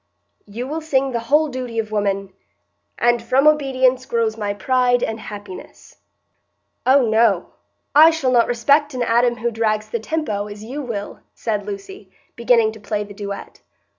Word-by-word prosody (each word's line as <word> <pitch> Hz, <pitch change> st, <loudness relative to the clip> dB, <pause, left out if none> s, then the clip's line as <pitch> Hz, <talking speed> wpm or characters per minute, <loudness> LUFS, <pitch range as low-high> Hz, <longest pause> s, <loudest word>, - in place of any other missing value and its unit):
You 225 Hz, +5 st, -5 dB
will 315 Hz, +3 st, -4 dB
sing 275 Hz, -4 st, 0 dB
the 235 Hz, -, -1 dB
whole 305 Hz, +2 st, +4 dB
duty 255 Hz, -4 st, -6 dB
of 220 Hz, -1 st, -2 dB
woman,—'And 195 Hz, -, -3 dB
from 260 Hz, +4 st, +2 dB
obedience 260 Hz, -4 st, +2 dB
grows 230 Hz, -2 st, 0 dB
my 205 Hz, -2 st, -3 dB
pride 245 Hz, +4 st, +1 dB
and 225 Hz, 0 st, -2 dB
happiness.'" 205 Hz, -3 st, -10 dB, 0.9 s
"Oh 260 Hz, -2 st, +5 dB
no, 220 Hz, -4 st, +2 dB, 0.4 s
I 310 Hz, +3 st, +8 dB
shall 320 Hz, -6 st, 0 dB
not 240 Hz, -2 st, +4 dB
respect 285 Hz, +4 st, +2 dB
an 250 Hz, -, -1 dB
Adam 240 Hz, +1 st, +2 dB
who 235 Hz, +1 st, -2 dB
drags 215 Hz, -1 st, -1 dB
the 235 Hz, -, -1 dB
tempo, 220 Hz, -6 st, -3 dB
as 205 Hz, 0 st, -9 dB
you 265 Hz, +7 st, -6 dB
will," 225 Hz, -6 st, -6 dB, 0.2 s
said 210 Hz, -3 st, -3 dB
Lucy, 200 Hz, -1 st, -8 dB, 0.3 s
beginning 235 Hz, -2 st, +3 dB
to 220 Hz, -, -12 dB
play 210 Hz, 0 st, -3 dB
the 205 Hz, 0 st, -11 dB
duet. 200 Hz, -1 st, -8 dB
230 Hz, 160 wpm, -20 LUFS, 205-255 Hz, 0.9 s, I